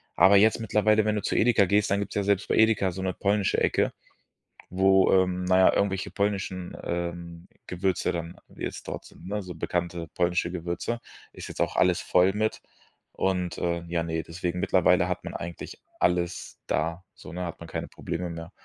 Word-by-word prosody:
Aber 95 +4 +7
jetzt 110 +3 +4
mittlerweile, 110 -1 +2
wenn 105 0 +1
du 105 - -1
zu - - -2
Edeka 110 -3 +4
gehst, 100 +2 +2
dann 100 - +2
gibt 100 - -4
es - - -10
ja 100 - +1
selbst 100 0 +1
bei - - +1
Edeka 110 -4 +3
so 95 +2 -6
'ne 95 -1 -1
polnische 100 +1 +1
Ecke, - - +1 0.8
wo, 95 +1 +4
ähm, 90 -1 +2
na 95 0 +3
ja, 95 - +6
irgendwelche 95 -1 0
polnischen, 100 -3 -2
ähm, 85 0 -5 0.2
Gewürze 90 0 0
dann 85 0 -5 0.2
jetzt - - -6
dort - - -6
sind, 90 - -14
ne, 105 +2 -2
so 90 -2 -8
bekannte 85 0 -3
polnische 90 0 0
Gewürze. 85 +6 -3 0.3
Ist - - -9
jetzt - - -5
auch - - 0
alles 90 0 +3
voll 90 +2 +3
mit 110 +1 -1 0.5
und 90 -2 -1
äh, 85 -1 -1
ja, 85 -1 -1
ne, 80 0 -2
deswegen, 85 +1 -4
mittlerweile - - +3
hat - - -3
man - - -6
eigentlich 85 0 -7 0.2
alles 90 0 -1
da 80 +5 -1
so, 75 - -12
ne, 90 +1 -3
hat 85 - -7
man 85 - -10
keine - - -4
Probleme 90 +1 -5
mehr. 85 0 -7
90 Hz, 195 wpm, -27 LUFS, 85-100 Hz, 0.8 s, Aber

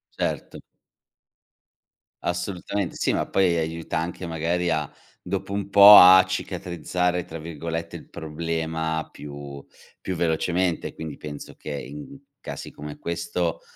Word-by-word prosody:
Certo. - - -3 1.6
Assolutamente 90 +1 -3
sì, - - +1
ma - - 0
poi, 90 -3 +2
aiuta 80 -1 -3
anche 85 +2 -4
magari 85 +2 -1
a 75 -3 0 0.4
dopo 100 +1 -3
un 100 -1 -3
po', 100 +1 +11
a 95 +1 +10
"cicatrizzare" 90 -1 -2
tra 80 - -8
virgolette 85 +1 -5
il - - -10
problema 80 0 -3
più, 70 -1 -9 0.3
più 95 - -4
velocemente, 85 +1 0
quindi 80 -3 -7
penso 75 -1 -8
che, 75 - -8
in 140 - -7 0.2
casi - - -7
come 75 0 -9
questo, 85 0 -2
85 Hz, 120 wpm, -24 LUFS, 80-90 Hz, 1.6 s, po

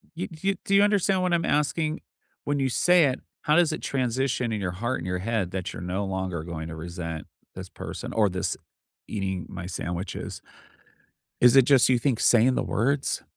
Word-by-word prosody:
You 175 - -3
do 165 +3 -7
you 195 - +3
do 195 - +2
you 200 - +7
understand 200 -2 +2
what 180 -1 +1
I'm 170 -1 +1
asking? 155 +2 0 0.4
When 145 0 0
you 135 -1 +1
say 175 +5 +4
it, 130 -1 0 0.2
how 150 - +3
does 170 -2 +4
it 155 - -4
transition 130 -1 -1
in 110 -2 -2
your 90 -2 -1
heart 120 +8 -2
and 85 - -6
your 90 0 -2
head 100 -2 -1
that 95 -2 -4
you're - - -8
no 90 +3 -2
longer 95 -4 -3
going 80 -1 -6
to 80 - -6
resent 85 -1 -6 0.3
this - - -8
person - - -7
or 105 -3 +3
this 90 -1 -2 0.5
eating 95 -4 -3
my 90 - -7
sandwiches? 90 0 -5 1.0
Is 125 +1 +7
it 135 - +8
just 130 -1 +5
you 130 - +4
think 120 -1 0
saying 125 +2 +5
the - - 0
words? 135 +5 0
120 Hz, 200 wpm, -26 LUFS, 90-145 Hz, 1.0 s, it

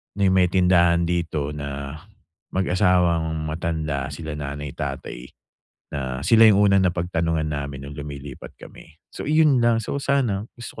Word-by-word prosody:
na 100 - -4
'yung 95 -1 +4
may 90 - +4
tindahan 85 -2 +4
dito 80 -4 -2
na 70 +1 -6 0.5
mag-asawang 85 -4 +1
matanda, 80 -3 -2
sila 80 -2 -6
nanay-tatay, 70 -3 -6 0.7
na 65 -3 -4
sila 110 +6 +6
'yung 100 - +5
unang 95 -1 +4
napagtanungan 85 -2 -1
namin 70 -2 -5
no'ng 70 +1 -9
lumilipat 70 -2 -8
kami. 80 -1 -14 0.2
So - - -6
iyon 155 -5 +4
lang, 115 -1 +3
so - - -3
sana 125 -8 0
gusto 120 -2 -9
85 Hz, 140 wpm, -23 LUFS, 75-95 Hz, 0.7 s, sila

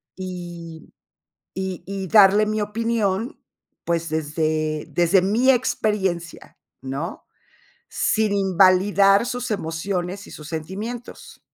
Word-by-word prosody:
Y 175 -3 -8 0.7
y 190 -2 -4
y 195 -1 -4
darle 205 +1 +6
mi 215 0 -1
opinión, 220 +1 -1 0.4
pues, 170 -1 -1
desde 155 0 -1
desde 175 +4 +3
mi 225 +8 +2
experiencia, 210 -9 -1 0.2
¿no? 135 +6 -5 0.6
Sin 215 -2 +1
invalidar 195 +2 +4
sus 245 0 -4
emociones 180 +1 -3
y - - -13
sus 150 -1 -10
sentimientos. 200 +10 -7
190 Hz, 100 wpm, -22 LUFS, 170-210 Hz, 0.7 s, darle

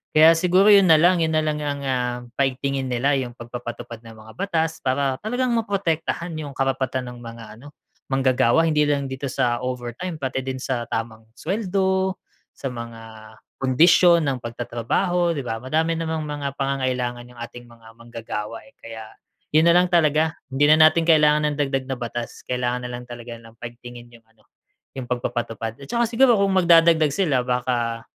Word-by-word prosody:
kaya 160 +2 +8
siguro 180 +3 +3
'yon 195 -3 +6
nalang, 170 +3 +5
'yon 160 -1 0
nalang 155 -1 -1
ang, 145 -1 -3
ah, 125 -2 -1 0.2
paigtingin 135 0 -1
nila, 125 +4 +1
yung 125 -2 -6
pagpapatupad 120 -1 -8
ng 115 -1 -13
mga 110 - -13
batas 165 -4 -1
para 135 0 -1
talagang 245 +3 -1
maprotektahan 180 -6 -2
yung 150 -3 -6
karapatan 130 -1 -1
ng 120 - -12
mga, 115 -1 -9 0.2
ano, 145 - -12 0.4
manggagawa 130 +2 +3
hindi 155 -2 +2
lang 140 -1 0
dito 135 +1 -5
sa 125 -2 0
overtime 125 +7 -5
pati 130 -1 -2
din 130 0 -4
sa 125 -2 -2
tamang 115 0 -4
suweldo, 190 0 -1 0.3
sa 135 - -6
mga 115 -3 -9 0.3
kondisyon 170 +5 +5
ng 135 -2 0
pagtatrabaho, 120 - -1
'di 140 - -3
ba? 115 - -2
Madami 160 +5 0
namang 160 -1 -3
mga 145 -1 -4
pangangailangan 130 -3 -2
yung 120 - -16
ating 120 +1 -8
mga 115 -1 -18
manggagawa, 115 -2 -7
eh, - - -22
kaya 110 -1 -9 0.5
'yon 155 - +6
nalang 180 +1 +5
talaga. 160 -2 +2 0.2
Hindi 135 +2 +2
na 155 - +6
natin 165 +1 0
kailangan 150 -2 +4
ng - - -11
dagdag 135 -2 -1
na 135 - -2
batas, 120 -1 -6
kailangan 125 0 -2
nalang 125 0 -7
talaga 120 0 -9
nilang 115 0 -16
paigtingin 120 0 -10
yung, 115 -1 -18
ano, 115 -1 -31 0.5
yung 130 -2 -5
pagpapatupad 115 -2 -4
at - - -11
saka 235 +9 0
siguro, 240 +1 +4
kung 200 0 +2
magdadagdag 165 -3 +5
sila, 150 -9 +1
baka 120 -2 -1
135 Hz, 165 wpm, -22 LUFS, 120-160 Hz, 0.5 s, kaya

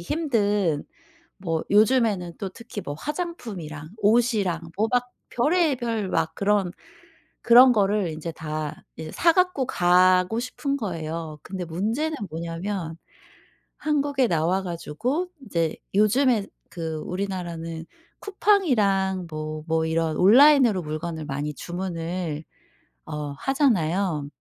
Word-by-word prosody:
힘든 205 - 0 0.5
뭐 165 -4 -2
요즘에는 210 -5 +3
또 195 - -3
특히 230 +1 -8
뭐 145 - -5
화장품이랑 195 - -6
옷이랑 210 -6 +2 0.2
뭐 220 - +2
막 245 0 0 0.2
별의별 245 - +1
막 165 -2 -1
그런 200 -2 +1 0.7
그런 245 +2 +8
거를 205 -3 +1
인제 160 +1 -5
다 155 -1 -5
이제 160 -1 -7
사 335 - +4
가지고 360 -8 +2
가고 185 +4 +3
싶은 275 +3 -3
거예요. 165 - -5
근데 185 -1 -5
문제는 225 - -1
뭐냐면 165 +1 -4 0.8
한국에 285 -3 +1
나와 175 +3 +1
가지고 190 - -3 0.2
이제 165 -5 -1 0.2
요즘에 215 +1 +3 0.2
그 165 -3 -4
우리나라는 175 -4 -4 0.3
쿠팡이랑 215 - +2
뭐 155 0 -5
뭐 160 0 +1
이런 160 -1 0
온라인으로 240 - +6
물건을 155 0 -5
많이 145 +1 -3
주문을 170 -2 -4 0.6
어. 150 -1 -5
하잖아요. 185 - +1
190 Hz, 245 characters per minute, -24 LUFS, 165-240 Hz, 0.8 s, 그런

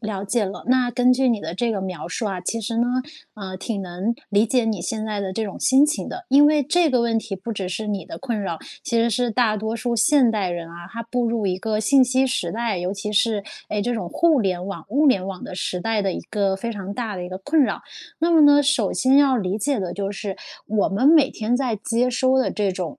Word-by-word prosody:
了 210 -3 -4
解 210 +1 0
了。 190 - -7
那 250 0 +2
根 250 +1 +3
据 260 0 +2
你 230 - +2
的 170 - -5
这 235 +5 0
个 200 -4 -2
描 185 -3 -5
述 220 +5 -3
啊， 190 -3 -3
其 205 +5 -3
实 230 +1 -3
呢， 240 - +2 0.5
啊， 195 -3 -7
挺 200 0 -4
能 185 +5 -3 0.2
理 205 +2 +3
解 250 +1 +1
你 220 -4 -1
现 215 +5 -3
在 210 -2 -3
的 195 -1 -3
这 220 +4 -2
种 200 - -7
心 270 +2 +5
情 305 +1 -2
的， 365 - -7
因 285 +2 +6
为 300 -1 +3
这 335 +4 +2
个 250 -4 +2
问 230 -1 +1
题 205 -3 -5
不 215 +5 -6
只 195 -3 -4
是 215 +4 -4
你 200 -5 -3
的 - - -8
困 235 -5 -3
扰， 170 -5 -3 0.2
其 235 - -2
实 230 +1 +3
是 245 +2 0
大 225 -2 +2
多 220 +2 -3
数 235 +1 -2
现 260 +1 +4
代 205 -4 -1
人 170 -1 -4
啊， 170 +1 -10
他 230 +2 -6
步 240 +1 -1
入 225 -3 -1
一 185 -1 -1
个 215 +2 -1
信 265 +5 +5
息 260 +1 +2
时 215 -9 -1
代， 225 -2 -2
尤 180 +2 -3
其 210 +1 -5
是， 215 -1 +1 0.2
哎， 210 -1 -1
这 245 - -1
种 220 -7 -3
互 320 - +3
联 185 -3 -1
网、 195 - -7
物 285 +8 +2
联 195 -8 +3
网 190 -2 -6
的 - - -7
时 180 0 -3
代 225 -1 0
的 195 -2 0
一 - - -4
个 195 -2 0
非 230 +4 -4
常 200 -1 -6
大 225 -2 -3
的 180 - -5
一 180 - -6
个 185 - -6
困 285 +12 +1
扰。 - - -1 0.4
那 335 +2 +2
么 330 -2 +5
呢 290 -1 +7
首 290 +2 +1
先 260 +1 +3
要 275 -2 +4
理 195 -2 -2
解 275 +3 0
的 185 -3 -3
就 200 -1 -3
是 200 -1 -5 0.3
我 210 -1 +1
们 205 +8 +1
每 305 -4 +5
天 220 +2 -2
在 250 -5 -1
接 230 +4 0
收 260 +1 +2
的 260 - +1
这 205 -3 -1
种， 180 -4 -5
220 Hz, 285 characters per minute, -22 LUFS, 195-250 Hz, 0.5 s, 呢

